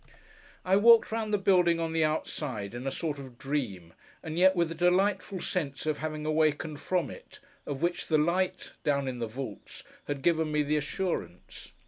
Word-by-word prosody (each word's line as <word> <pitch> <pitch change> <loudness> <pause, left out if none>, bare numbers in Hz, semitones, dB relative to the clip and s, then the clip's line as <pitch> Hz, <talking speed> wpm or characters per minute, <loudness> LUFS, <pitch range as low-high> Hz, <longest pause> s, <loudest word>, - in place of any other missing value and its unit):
I 190 +1 +4
walked 230 +2 +6
round 220 -1 -2
the 210 - +3
building 180 -4 +3
on 165 -1 -2
the 165 -1 +2
outside, 140 -8 -2
in 120 +2 -5
a - - +2
sort 150 0 -3
of 130 -3 -10
dream, 110 - -3 0.3
and 160 -1 -5
yet 190 +1 +6
with 170 -2 +1
the - - -4
delightful 185 +3 +1
sense 155 -6 -3
of 155 -1 -1
having 155 -1 -4
awakened 155 -1 +1
from 180 -2 -1
it, - - -13 0.3
of 145 +2 -4
which 175 0 -1
the 155 - +3
light, 180 +4 0
down 140 -2 +1
in 125 -2 -4
the 115 - -2
vaults, 115 -2 -8 0.2
had 140 -2 -3
given 160 -2 +2
me 150 0 +2
the 150 +1 +1
assurance. 145 - -4
155 Hz, 185 wpm, -29 LUFS, 140-180 Hz, 0.3 s, walked